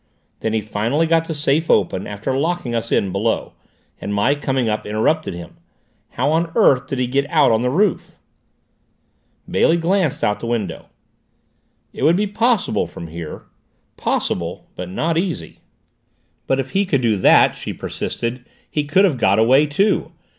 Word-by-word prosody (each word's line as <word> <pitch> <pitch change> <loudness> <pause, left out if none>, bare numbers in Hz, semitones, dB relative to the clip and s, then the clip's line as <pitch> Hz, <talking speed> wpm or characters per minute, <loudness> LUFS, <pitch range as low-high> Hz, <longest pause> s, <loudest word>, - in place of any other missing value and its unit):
Then 110 - -2
he 110 - +1
finally 115 +9 0
got 165 0 +2
the 160 - -2
safe 150 +2 0
open, 95 - +1
after 105 +6 -3
locking 160 -3 -1
us 115 0 -2
in 95 - +1
below, 110 +4 -1 0.5
and 100 - -5
my 105 +7 +2
coming 135 -4 -1
up 105 -1 -1
interrupted 110 - 0
him. 85 -1 -10 0.6
How 145 - +1
on 165 +1 0
earth 135 - +4
did 135 -2 -3
he 125 - +1
get 140 +3 -1
out 150 -6 +4
on 110 0 +2
the 125 - +1
roof?" 190 +7 0 1.3
Bailey 165 - +3
glanced 170 -2 0
out 105 -1 +1
the 115 - -5
window. 105 -8 -3 1.1
"It - - -8
would 165 - +4
be 210 - +1
possible 210 - +1
from 85 - -9
here. 80 -1 -7 0.5
Possible, - - -2
but 90 - -6
not 160 - 0
easy." 170 - -4 0.9
"But, 135 - +1
if 135 -1 -3
he 195 +1 +2
could 160 -9 0
do 115 -3 +2
that," 95 - +5
she - - -6
persisted, 120 +1 -4 0.3
"he 150 -1 -1
could 185 +7 +4
have 150 -10 0
got 100 -2 +3
away, 130 +7 +4
too. 195 +9 +1
135 Hz, 170 wpm, -20 LUFS, 110-165 Hz, 1.3 s, that